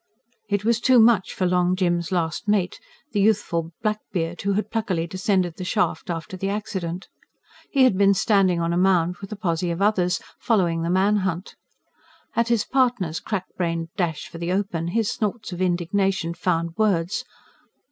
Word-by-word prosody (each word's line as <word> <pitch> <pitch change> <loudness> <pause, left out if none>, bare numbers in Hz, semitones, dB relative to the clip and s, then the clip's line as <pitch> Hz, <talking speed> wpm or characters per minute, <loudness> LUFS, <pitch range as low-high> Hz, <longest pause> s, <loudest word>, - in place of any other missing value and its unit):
It 205 0 0
was 230 0 +3
too 255 +1 +5
much 220 -4 +4
for 185 - -1
Long 180 0 +2
Jim's 175 -2 0
last 170 +4 -1
mate, 200 -3 +1 0.3
the 205 - +1
youthful 180 -6 +1
blackbeard 180 -6 -2
who 200 0 0
had 210 +1 -2
pluckily 190 -7 -1
descended 185 -1 0
the 185 - -5
shaft 200 0 -1
after 170 +4 -4
the 195 +1 -2
accident. 190 -4 -4 0.6
He 270 -2 +3
had 255 -7 +5
been 200 0 +5
standing 190 -4 +3
on 170 0 0
a - - +1
mound 180 -2 +2
with 195 +2 -10
a - - -3
posse 175 -4 -1
of 170 +1 -2
others, 195 -3 +2 0.2
following 175 -7 +1
the 165 - -1
man 195 +4 +3
hunt. 185 -1 -2 0.8
At 235 0 +2
his 235 -3 +1
partner's 240 -12 +1
crack 190 +1 -3
brained 165 -2 -1
dash 165 -5 -2
for 165 - -10
the 170 +1 -2
open, 185 -4 -1
his 215 +4 0
snorts 215 0 -3
of 175 - -5
indignation 180 0 0
found 170 -1 -1
words. 195 -4 +1
185 Hz, 175 wpm, -23 LUFS, 170-210 Hz, 0.8 s, too